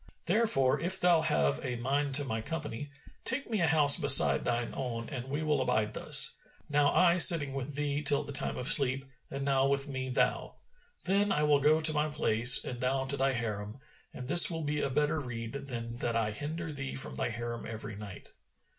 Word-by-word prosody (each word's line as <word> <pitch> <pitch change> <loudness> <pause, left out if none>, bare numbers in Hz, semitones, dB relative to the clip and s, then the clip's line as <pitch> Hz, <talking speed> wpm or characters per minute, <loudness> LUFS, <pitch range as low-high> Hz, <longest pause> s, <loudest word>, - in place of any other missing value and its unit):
Therefore 175 - +1
if 185 +2 -2
thou 175 -2 +2
have 70 - -1
a 125 -1 -5
mind 135 +3 -2
to 145 0 +1
my 110 -4 -5
company, 145 -1 -7 0.3
take 265 +2 0
me 215 -4 -2
a 165 - +1
house 145 0 +5
beside 140 -3 +6
thine 120 -1 -3
own 115 -3 -6
and 130 -4 -7
we 145 +3 -4
will 150 -3 -1
abide 110 -4 -2
thus, - - +2 0.3
now 145 -1 +1
I 175 -1 +2
sitting 155 -6 +7
with 135 +1 -7
thee 145 0 -3
till 145 -1 +2
the - - -10
time 140 0 -3
of 125 - -5
sleep, 135 -3 +3 0.2
and 135 0 -6
now 135 -1 0
with 140 0 -2
me 130 -2 -6
thou. 125 - -2 0.5
Then 200 +2 -1
I 150 - -1
will 150 -1 +2
go 150 +3 +2
to 155 0 +3
my 150 0 -1
place 125 -5 +4
and 125 -1 -8
thou 130 +1 -2
to 140 +1 -2
thy 135 0 -1
Harim 105 -2 -6 0.3
and 125 - -10
this 175 +5 +6
will 165 -2 -5
be 150 0 -3
a - - -3
better 150 +3 -2
rede 115 -4 -8
than 120 -4 -8
that 120 -1 -4
I 110 -2 -2
hinder 155 +6 -7
thee 135 -1 -7
from 135 - -3
thy - - -4
Harim 120 0 -7
every 110 -2 -9
night.' 100 -2 -12
135 Hz, 210 wpm, -29 LUFS, 120-150 Hz, 0.5 s, sitting